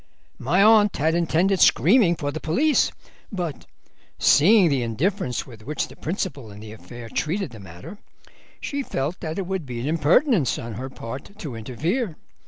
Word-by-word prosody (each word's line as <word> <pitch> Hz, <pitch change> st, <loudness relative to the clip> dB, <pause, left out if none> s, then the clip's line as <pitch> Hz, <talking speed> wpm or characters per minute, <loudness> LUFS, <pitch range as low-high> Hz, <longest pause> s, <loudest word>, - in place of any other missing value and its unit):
My 180 Hz, +10 st, +2 dB
aunt 210 Hz, -2 st, +5 dB
had 160 Hz, +3 st, +1 dB
intended 175 Hz, +3 st, +1 dB
screaming 185 Hz, -, +5 dB
for 145 Hz, -2 st, -3 dB
the 155 Hz, -, -5 dB
police, 280 Hz, -, +2 dB, 0.4 s
but 175 Hz, -, -5 dB, 0.5 s
seeing 195 Hz, +5 st, +5 dB
the 140 Hz, -5 st, +1 dB
indifference 125 Hz, -, -2 dB
with 115 Hz, -4 st, -13 dB
which 150 Hz, +6 st, -3 dB
the -, -, -13 dB
principal 155 Hz, -, -4 dB
in 100 Hz, 0 st, -11 dB
the 105 Hz, 0 st, -10 dB
affair 115 Hz, +4 st, -11 dB
treated 165 Hz, -, -2 dB
the 115 Hz, -, -11 dB
matter 95 Hz, -, -11 dB, 0.6 s
she 285 Hz, 0 st, -3 dB
felt 155 Hz, -, -3 dB
that 160 Hz, -1 st, -5 dB
it 195 Hz, -, -2 dB
would 190 Hz, -1 st, -3 dB
be 120 Hz, -2 st, -5 dB
an 120 Hz, -, -4 dB
impertinence 165 Hz, -, +2 dB
on 115 Hz, -1 st, -6 dB
her 130 Hz, +5 st, -6 dB
part 130 Hz, -, -9 dB
to 150 Hz, -, -7 dB
interfere. 160 Hz, -, -3 dB
155 Hz, 170 wpm, -23 LUFS, 125-195 Hz, 0.6 s, aunt